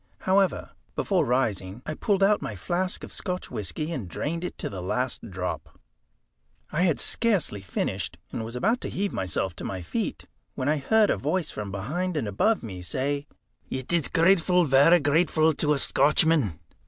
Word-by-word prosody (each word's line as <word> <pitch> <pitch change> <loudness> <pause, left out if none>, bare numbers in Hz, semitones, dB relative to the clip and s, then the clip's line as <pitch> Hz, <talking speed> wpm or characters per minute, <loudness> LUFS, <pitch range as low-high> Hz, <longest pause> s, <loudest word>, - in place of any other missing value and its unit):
However, 190 -1 +1 0.2
before - - +1
rising, 110 -4 -1
I 155 - -3
pulled 195 +4 +1
out 205 +1 +4
my 105 - -4
flask 180 - -2
of - - -8
Scotch 180 -2 -4
whisky, 105 - -3
and 130 - -4
drained 165 - -3
it 180 - -5
to - - -3
the 95 -3 -6
last 125 +5 -2
drop. 90 -1 -5 0.9
I 160 - 0
had 175 -5 +2
scarcely 195 - +1
finished, 90 -5 -3
and - - -4
was 115 +2 -6
about 225 - +1
to - - -4
heave 200 +1 -2
myself 95 -1 -2
to - - -7
my 95 -2 -4
feet, 80 - -3 0.3
when 130 - -2
I 155 +1 +3
heard 215 +9 +3
a - - +1
voice 185 -5 -1
from 105 -2 -5
behind 155 - -2
and 130 - -1
above 210 - +1
me 95 -5 -7
say 140 +9 -2 0.4
"It 130 +5 -3
is 170 -3 +3
grateful, 180 +1 +4
varra 145 +5 +6
grateful 155 +1 +3
to 150 +1 +2
a - - 0
Scotchman." 145 - +3
145 Hz, 180 wpm, -26 LUFS, -, 0.9 s, varra